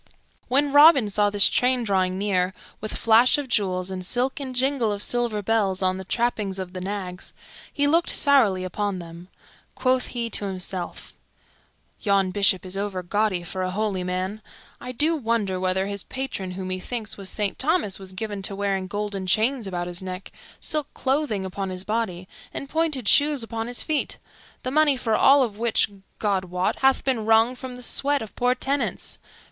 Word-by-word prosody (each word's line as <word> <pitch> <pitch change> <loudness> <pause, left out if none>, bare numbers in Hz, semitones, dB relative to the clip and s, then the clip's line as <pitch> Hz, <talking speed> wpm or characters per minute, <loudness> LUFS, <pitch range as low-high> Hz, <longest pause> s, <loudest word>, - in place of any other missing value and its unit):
When 280 +2 +2
Robin 290 -7 +7
saw 205 +1 +2
this 205 -1 +6
train 250 0 +2
drawing 185 -3 +1
near, 190 -2 0 0.2
with 215 - -5
flash 230 +4 +5
of 290 -2 -4
jewels 190 -5 0
and 185 -1 -4
silk 250 - 0
and 260 -2 -6
jingle 260 -3 +1
of 205 0 -1
silver 235 -4 0
bells 195 -3 +1
on 185 0 +1
the 190 - -6
trappings 210 -2 -1
of 185 -1 -5
the 185 - -6
nags, 190 -1 -5 0.4
he 285 - +1
looked 330 +4 +2
sourly 230 -10 +3
upon 200 +1 -2
them. 170 0 -10 0.5
Quoth 255 -1 +1
he 235 -1 -3
to 205 - -1
himself, 185 -2 -4 0.9
"Yon 195 -2 +2
Bishop 195 -2 +2
is 185 +1 -5
overgaudy 195 -1 -1
for 185 +2 -4
a 185 - -1
holy 195 -1 -1
man. 185 +4 -3 0.4
I 250 - -6
do 305 +7 +1
wonder 225 -8 -1
whether 185 +1 0
his 200 0 -3
patron, 245 -9 -5
who, 190 0 -5
methinks, 205 +4 -4
was 195 -2 -6
Saint 205 -2 -2
Thomas, 280 - +1
was 190 -1 -8
given 205 0 -4
to 195 +1 0
wearing 195 -1 -1
golden 205 -1 -4
chains 225 +4 +2
about 175 -2 -3
his 175 +1 -3
neck, 185 0 -7 0.3
silk 305 -2 -1
clothing 265 -8 0
upon 190 +1 -4
his 185 0 -4
body, 195 -4 -2 0.2
and 275 - -6
pointed 305 -6 -1
shoes 290 -3 +4
upon 225 0 -4
his 245 0 -1
feet; 305 -2 -1 0.5
the 255 - -2
money 300 -1 +4
for 230 -3 -1
all 275 +5 +6
of 215 -4 -4
which, 230 -2 +2 0.3
God 195 -3 0
wot, 180 +1 -1
hath 265 0 +3
been 255 -5 0
wrung 225 +2 +4
from 255 0 -8
the 250 - -5
sweat 280 +2 +2
of 215 - -11
poor 250 +1 +2
tenants. 275 +2 -2
210 Hz, 180 wpm, -24 LUFS, 190-250 Hz, 0.9 s, Robin